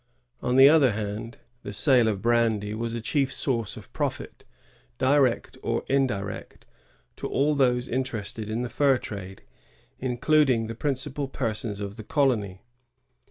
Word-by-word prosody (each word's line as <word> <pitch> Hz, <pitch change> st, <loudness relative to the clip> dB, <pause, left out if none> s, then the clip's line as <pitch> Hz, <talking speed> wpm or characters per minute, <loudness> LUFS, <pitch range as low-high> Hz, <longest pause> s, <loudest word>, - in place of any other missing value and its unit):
On 125 Hz, -, 0 dB
the 135 Hz, +1 st, +9 dB
other 145 Hz, -6 st, +5 dB
hand, 105 Hz, +2 st, -5 dB, 0.2 s
the -, -, -7 dB
sale 120 Hz, +2 st, +3 dB
of 105 Hz, -2 st, -2 dB
brandy 115 Hz, -3 st, +1 dB
was 115 Hz, +1 st, -3 dB
a 115 Hz, -, -4 dB
chief 135 Hz, +3 st, 0 dB
source 115 Hz, -6 st, -1 dB
of -, -, -13 dB
profit, -, -, -4 dB, 0.5 s
direct 135 Hz, -, +2 dB
or -, -, -1 dB
indirect, 120 Hz, -8 st, -2 dB, 0.5 s
to -, -, -4 dB
all 145 Hz, +2 st, +1 dB
those 125 Hz, -3 st, +2 dB
interested 115 Hz, -4 st, -3 dB
in 115 Hz, +3 st, -2 dB
the 125 Hz, -, -4 dB
fur 135 Hz, +2 st, +3 dB
trade, 95 Hz, -4 st, -8 dB, 0.6 s
including 130 Hz, -1 st, +2 dB
the 115 Hz, -, -5 dB
principal 140 Hz, +3 st, -2 dB
persons 110 Hz, -5 st, -3 dB
of 100 Hz, +1 st, -6 dB
the 110 Hz, -, -7 dB
colony. 105 Hz, -9 st, 0 dB
120 Hz, 145 wpm, -26 LUFS, 110-135 Hz, 0.6 s, the